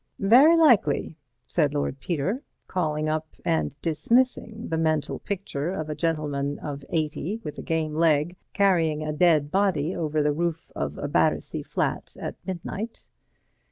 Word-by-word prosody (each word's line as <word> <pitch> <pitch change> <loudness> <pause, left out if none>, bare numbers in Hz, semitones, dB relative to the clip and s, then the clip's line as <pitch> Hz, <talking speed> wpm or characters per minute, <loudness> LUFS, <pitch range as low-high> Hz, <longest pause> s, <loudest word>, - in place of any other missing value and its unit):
"Very 260 +12 +6
likely," 235 - +4 0.3
said 150 -4 +1
Lord 140 -1 -1
Peter, 180 - -1 0.2
calling 155 -4 -1
up 155 0 -1 0.2
and 80 -2 0
dismissing 225 +7 +1
the 160 - 0
mental 155 -2 0
picture 175 -6 -3
of 155 -4 -4
a - - -3
gentleman 145 -4 -1
of 145 -2 -6
eighty 160 +6 -2
with 150 - -6
a - - -4
game 160 -2 -1
leg 160 +1 +2 0.2
carrying 165 -6 +2
a 155 0 -2
dead 150 -2 +3
body 185 -4 +1
over 155 -2 0
the 150 0 +2
roof 170 +1 -2
of - - -3
a - - -3
Battersea - - +1
flat - - -3
at - - -4
midnight. 190 +5 -5
160 Hz, 150 wpm, -26 LUFS, 150-190 Hz, 0.3 s, Very